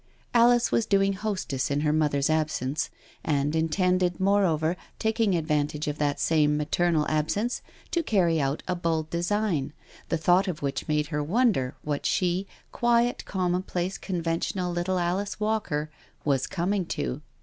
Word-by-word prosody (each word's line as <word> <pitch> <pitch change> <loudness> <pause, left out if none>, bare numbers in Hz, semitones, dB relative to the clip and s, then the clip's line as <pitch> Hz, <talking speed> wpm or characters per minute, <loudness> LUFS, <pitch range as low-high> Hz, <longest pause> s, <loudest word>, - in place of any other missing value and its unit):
Alice 240 0 +5
was 230 - +1
doing 195 0 +3
hostess 190 -10 -2
in 145 +1 0
her 150 0 +2
mother's 145 -3 +2
absence, 155 -3 0 0.3
and 145 0 0
intended, 180 +2 +1
moreover, 185 -5 +2 0.2
taking 220 -3 +1
advantage 150 -2 -1
of 150 0 -3
that 145 -1 0
same 150 -2 +3
maternal 155 +1 +1
absence 160 +10 0 0.3
to 340 - +1
carry 175 - +2
out 135 +2 -1
a 180 - +1
bold 165 -2 -1
design, 170 -5 0 0.4
the 165 - +1
thought 180 +4 +3
of 165 -5 -4
which 140 -1 -2
made 150 -1 0
her 150 -1 -1
wonder 180 - +1
what 145 -1 -2
she, 185 +1 0 0.2
quiet, 240 0 +2
commonplace, 180 0 -1
conventional 175 0 -2
little 175 +2 0
Alice 180 +4 -1
Walker, 210 -9 -1 0.3
was 135 -3 +1
coming 190 +3 0
to. 60 -2 -3
170 Hz, 145 wpm, -27 LUFS, 150-195 Hz, 0.4 s, Alice